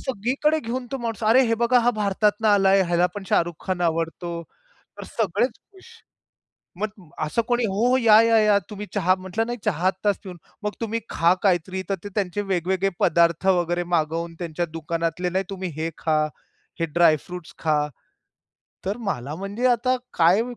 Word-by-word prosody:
सगळीकडे 265 +6 0
घेऊन 245 +2 -4
तो 270 - -2
माणूस, 230 -2 -4
"अरे! 230 +5 +6
हे 230 - +3
बघा, 245 +1 +5
हा 240 +1 +3
भारतातून 210 +2 +1
आला 200 -2 +4
आहे. 195 0 +5
ह्याला 175 +1 +3
पण 205 - -5
शाहरुख 170 0 +1
खान 185 -2 -1
आवडतो". 170 +1 -2 0.6
तर - - -7
सगळेच 225 +3 0 0.2
खुश. 380 -1 -17 0.9
मग 205 -6 -5 0.2
असं 155 +10 0
कोणी 240 -1 +1
"हो, 210 +4 +1
हो. 255 - +4
या, 225 -3 +7
या, 230 0 +4
या. 210 -1 +4
तुम्ही 210 -1 -6
चहा", 185 -2 +3
म्हटलं, 190 +4 -3
"नाही, 240 0 -3
चहा 175 +3 +1
आत्ताच 195 +1 0
पिऊन" 180 -2 -9 0.3
"मग 210 - -1
तुम्ही 230 0 -1
खा 170 +2 +3
काहीतरी". 185 0 +1
तर 195 - +1
ते 205 - -6
त्यांचे 200 -1 -1
वेगवेगळे 190 +2 +1
पदार्थ 170 +2 +3
वगैरे 175 -1 +2
मागवून, 165 +2 -1
त्यांच्या 170 0 -2
दुकानातले, 165 +2 -2
"नाही, 190 +2 0
तुम्ही 190 -2 -4
हे 165 - -1
खा, 155 -1 +1 0.6
हे 165 - +1
ड्राय 160 0 +4
फ्रुट्स 180 -2 -9
खा". 155 -2 +2 1.1
तर 200 +4 -1
मला 140 +1 -4
म्हणजे 200 +7 -2
आता 255 +1 +2 0.2
काय 175 +6 +4
190 Hz, 175 wpm, -24 LUFS, 170-220 Hz, 1.1 s, या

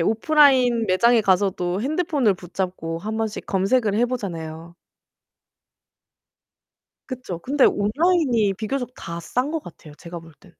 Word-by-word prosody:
오프라인 245 - +3
매장에 230 +5 +4
가서도 190 -2 0
핸드폰을 290 - +1
붙잡고 180 -2 -5
한번씩 220 +2 -4
검색을 200 +2 +1
해 240 +3 +2
보잖아요. 170 -8 -6 2.3
그쵸. 250 -10 -6
근데 270 +8 +1
온라인이 240 - +2
비교적 245 +5 -4
다 170 0 -7
싼 250 - -2
것 320 -1 -3
같아요 155 -3 -13
제가 170 +2 -9
볼 165 -1 -15
때는. 175 -2 -20
210 Hz, 285 characters per minute, -22 LUFS, 180-255 Hz, 2.3 s, 매장에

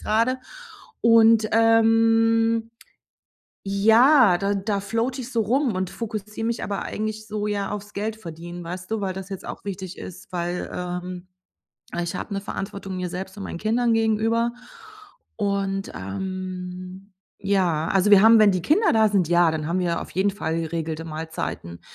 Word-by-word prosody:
grade. 230 +4 +1 0.6
Und, 225 -1 +5
ähm, 225 0 +3 0.9
ja, 220 +2 +5
da 200 +2 0
da 200 +1 -1
floate 230 +6 -2
ich 250 0 -7
so 230 -3 +1
rum 250 +2 +1
und 185 -1 -2
fokussiere 215 -1 -5
mich 235 0 -2
aber 200 -1 -3
eigentlich 215 0 -4
so 210 0 -3
ja 205 -1 -2
aufs 210 0 -6
Geld 215 +2 -3
verdienen, 175 -2 -9
weißt 180 +3 -7
du, 220 -1 -1
weil 190 -1 -1
das 190 0 -7
jetzt 195 -3 -7
auch - - -8
wichtig 190 -2 -6
ist, 185 - -10
weil, 175 0 -3
ähm, 180 0 -5 0.7
ich 170 +2 -3
habe 200 - -5
'ne 195 - -1
Verantwortung 195 -1 -6
mir 180 -1 -3
selbst 190 +2 -6
und 200 - -6
meinen 170 - -5
Kindern 230 +4 +1
gegenüber. 225 +1 +1 0.8
Und, 195 -2 -1
ähm, 185 - -6 0.3
ja, 180 -5 +1
also 195 +2 +2
wir 200 -2 +8
haben 225 +1 +7
wenn 210 -2 +6
die 185 -1 -1
Kinder 385 - +3
da 220 -1 +4
sind, 195 -5 +2
ja, 175 -1 +4
dann 155 -1 -3
haben 175 +3 0
wir 175 -2 0
auf - - -9
jeden 190 +2 +1
Fall 165 -4 -2
geregelte 165 0 -4
Mahlzeiten. 155 - -5
200 Hz, 165 wpm, -24 LUFS, 180-225 Hz, 0.9 s, wir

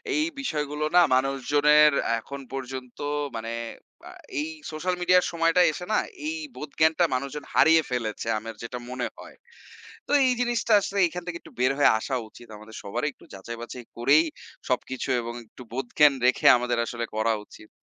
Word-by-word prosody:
এই 305 - +2 0.2
বিষয়গুলো 150 - -2
না, - - +9
মানুষজনের 145 +3 +4 0.3
এখন 140 +4 -8
পর্যন্ত 130 -1 -6 0.4
মানে 115 +1 -4 0.9
এই 155 - -2 0.2
সোশ্যাল 175 +4 -2
মিডিয়ার 180 +1 +3
সময়টায় 165 0 +4
এসে, 180 - -6
না - - +3 0.3
এই 320 - -2 0.2
বোধ 150 -1 -7
জ্ঞানটা 160 +2 +4
মানুষজন 140 +3 -4
হারিয়ে 160 0 +6
ফেলেছে। 115 -3 -3
আমার 115 +1 -7
যেটা 125 +1 -5
মনে 125 0 -3
হয়। - - -12 0.7
তো - - -5
এই 255 - +3
জিনিসটা 240 -2 +1
আসলে 200 0 -3
এখান 175 +1 -7
থেকে 175 -1 -4
একটু - - -15
বের 130 +2 +3
হয়ে 145 - +6
আসা 130 +3 -3
উচিত। 120 - -15
আমাদের 110 +1 -13
সবারই 150 +9 -2
একটু - - -20
যাচাই-বাচাই 115 +5 -8
করেই 140 +7 +4 0.4
সবকিছু 130 +1 -2
এবং 120 0 -6
একটু 125 - -13
বোধজ্ঞান 135 +3 +3
রেখে 125 - +3
আমাদের 120 0 -1
আসলে 120 0 -4
করা 110 +1 +2
উচিত। 110 - -16
140 Hz, 160 wpm, -26 LUFS, 120-160 Hz, 0.9 s, না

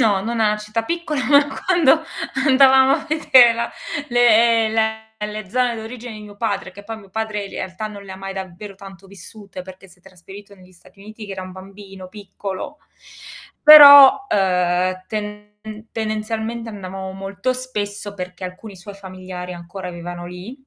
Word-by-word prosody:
No, 205 -5 +2
non 230 +2 -3
è 220 - +3
una 210 0 +1
città 215 +2 -4
piccola, 305 -2 -3
ma 285 +1 +5 0.2
quando 330 -4 +3 0.4
andavamo 265 0 +5
a - - -2
vedere 260 -6 +5
la 235 0 -3 0.4
le 230 -2 +4
le 220 0 -1 0.2
le 210 -1 -7
zone 245 +3 0
d'origine 230 +2 -8
di 215 - -10
mio 205 -1 -13
padre, 215 -3 -3
che 205 - -13
poi 225 +1 -7
mio 200 -2 -17
padre 215 0 -4
in 195 - -10
realtà 190 +4 -6
non 205 -1 -10
le 195 -1 -10
ha - - -9
mai 195 0 -8
davvero 190 +2 -8
tanto 195 0 -14
vissute, 195 0 -12
perché 190 +1 -14
si 180 0 -22
è - - -41
trasferito 195 +2 -14
negli 185 -1 -20
Stati 185 +2 -22
Uniti 215 +2 -11
che 200 - -8
era 190 - -7
un 185 0 -10
bambino 195 0 -12
piccolo. 200 +6 -8 0.8
Però, 290 +3 +9
ehm, 185 - 0
tende 210 -1 -6 0.4
tendenzialmente 220 +1 -4
andavamo 190 -2 -7
molto 195 +6 -4
spesso, 205 -5 -6
perché 180 -1 -8
alcuni 190 +3 -9
suoi 190 +3 -11
familiari 185 -2 -9
ancora 180 +2 -8
vivevano 175 0 -8
lì, 185 +10 -10
205 Hz, 170 wpm, -20 LUFS, 190-230 Hz, 0.8 s, Però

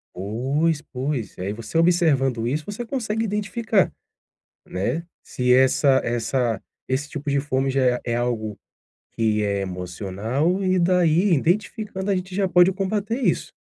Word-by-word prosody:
Pois, 135 - 0
pois, 130 -4 -4
aí 95 +3 -2
você 115 +7 -10
observando 145 -9 +3
isso, 150 +5 -1
você 215 +4 -5
consegue 225 -3 -2
identificar, 210 0 0 0.7
né. 100 - -2 0.2
Se 125 0 +1
essa 130 +1 +4
essa 120 0 0 0.3
esse 135 +3 -1
tipo 145 0 -5
de 140 0 +2
fome 135 -1 0
já 135 0 +1
é 125 0 +2
é - - +1
algo 115 -3 -2 0.6
que 110 -2 +1
é 100 -1 0
emocional 100 - -2
e 185 0 +2
daí, 180 +1 +3
identificando, 200 - 0
a - - +2
gente 185 0 -4
já 195 -1 +2
pode 180 +1 +5
combater 205 +4 -2
isso. 265 - 0
145 Hz, 145 wpm, -23 LUFS, 120-185 Hz, 0.7 s, pode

